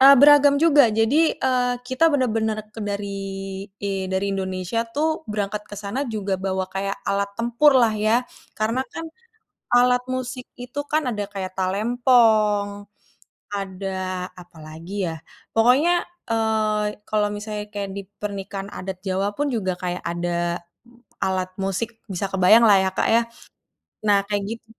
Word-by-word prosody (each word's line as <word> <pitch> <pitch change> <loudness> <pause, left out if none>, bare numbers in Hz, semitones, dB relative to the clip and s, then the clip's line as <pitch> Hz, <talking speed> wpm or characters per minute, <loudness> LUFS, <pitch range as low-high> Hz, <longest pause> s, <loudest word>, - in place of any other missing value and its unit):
Eee, 275 +1 +9
beragam 285 +1 +7
juga, 290 -4 +6
jadi, 225 +9 +2
eee, 250 -1 +1
kita 260 +6 +3
bener-bener 225 -5 +1
ke 225 - -8
dari 205 -1 -3 0.8
i 195 -1 -2
dari 190 +1 -1
Indonesia 190 +2 -2
tuh 295 +7 0 0.2
berangkat 210 0 -2
ke 205 - -7
sana 210 +7 -3
juga 205 -3 -2
bawa 190 -1 -1
kayak 195 +1 -2
alat 200 0 0
tempurlah 240 0 +4
ya. 215 +3 +2 0.3
Karena 225 +4 0
kan 330 - -5 0.7
alat 250 0 +5
musik 255 0 -4
itu 250 +3 -5
kan 310 +1 +1
ada 205 -3 -3
kayak 190 -2 -5
talempong, 210 0 +2 0.7
ada 185 -1 -4
apalagi 175 +2 -6
ya, 165 - -4 0.4
pokoknya, 275 +10 +4 0.3
eee, 215 -2 0
kalau 210 -1 +1
misalnya 210 0 -5
kayak 200 -1 -3
di 200 - -4 0.2
pernikahan 200 -1 -5
adat 190 0 -5
Jawa 190 +2 0
pun 290 - 0
juga 185 -5 -2
kayak 180 0 -3
ada 175 0 -1 0.6
alat 185 -1 0 0.2
musik, 195 +4 -1 0.2
bisa 190 +1 -2
kebayanglah 205 +3 +6
ya, 190 - +1
Kak, - - +2
ya. 230 - +5 0.9
Nah 205 -1 +5
kaya 205 -1 0
gitu. 230 0 -7
210 Hz, 140 wpm, -23 LUFS, 195-245 Hz, 0.9 s, Eee